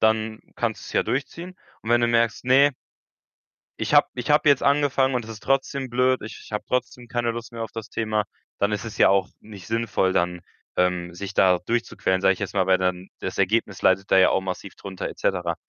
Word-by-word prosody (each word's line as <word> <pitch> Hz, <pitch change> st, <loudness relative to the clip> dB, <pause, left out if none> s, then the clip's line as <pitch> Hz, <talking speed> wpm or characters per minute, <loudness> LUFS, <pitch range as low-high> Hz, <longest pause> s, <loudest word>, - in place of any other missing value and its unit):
dann 110 Hz, 0 st, +1 dB, 0.2 s
kannst -, -, -2 dB
du -, -, -10 dB
es -, -, -9 dB
ja -, -, +2 dB
durchziehen 170 Hz, +7 st, -4 dB, 0.3 s
und 115 Hz, -, -5 dB
wenn 120 Hz, -, +4 dB
du 120 Hz, -, +2 dB
merkst: 115 Hz, -1 st, +1 dB
„Ne“ 135 Hz, +3 st, +5 dB, 1.1 s
„ich -, -, 0 dB
habe -, -, +6 dB
ich 120 Hz, +2 st, -5 dB
habe 150 Hz, 0 st, +4 dB
jetzt 140 Hz, -2 st, +4 dB
angefangen 140 Hz, -2 st, +2 dB
und 120 Hz, -2 st, -1 dB
es 115 Hz, -, -10 dB
ist 110 Hz, -, -9 dB
trotzdem 135 Hz, -1 st, 0 dB
blöd, 125 Hz, +1 st, +2 dB
ich 110 Hz, -, -10 dB
habe 105 Hz, -, -3 dB
trotzdem 125 Hz, -1 st, -2 dB
keine 120 Hz, -1 st, -1 dB
Lust 115 Hz, 0 st, -7 dB
mehr 115 Hz, -1 st, -5 dB
auf 110 Hz, -, -5 dB
das 115 Hz, -1 st, -7 dB
Thema“, 110 Hz, -1 st, -1 dB, 0.3 s
dann 100 Hz, +1 st, +1 dB
ist 105 Hz, +2 st, -2 dB
es 110 Hz, -, -8 dB
ja -, -, +6 dB
auch 95 Hz, -1 st, +2 dB
nicht 100 Hz, -4 st, -12 dB
sinnvoll 110 Hz, -4 st, 0 dB
dann, 90 Hz, 0 st, 0 dB, 0.4 s
ähm, 90 Hz, -1 st, 0 dB
sich 95 Hz, +2 st, -6 dB
da 90 Hz, -2 st, +4 dB
durchzuquälen, 95 Hz, -3 st, -1 dB
sage 95 Hz, -, +4 dB
ich -, -, -15 dB
jetzt 100 Hz, 0 st, -4 dB
mal, 95 Hz, -2 st, +2 dB
weil 95 Hz, -1 st, +4 dB
dann 90 Hz, 0 st, -2 dB
das -, -, -5 dB
Ergebnis 105 Hz, -3 st, 0 dB
leidet 95 Hz, +1 st, +2 dB
da 95 Hz, -, +6 dB
ja 95 Hz, -, +6 dB
auch 95 Hz, -, +2 dB
massiv 95 Hz, +1 st, -6 dB
drunter 95 Hz, -2 st, -6 dB
et -, -, -11 dB
cetera. 90 Hz, -3 st, 0 dB
110 Hz, 225 wpm, -24 LUFS, 95-120 Hz, 1.1 s, habe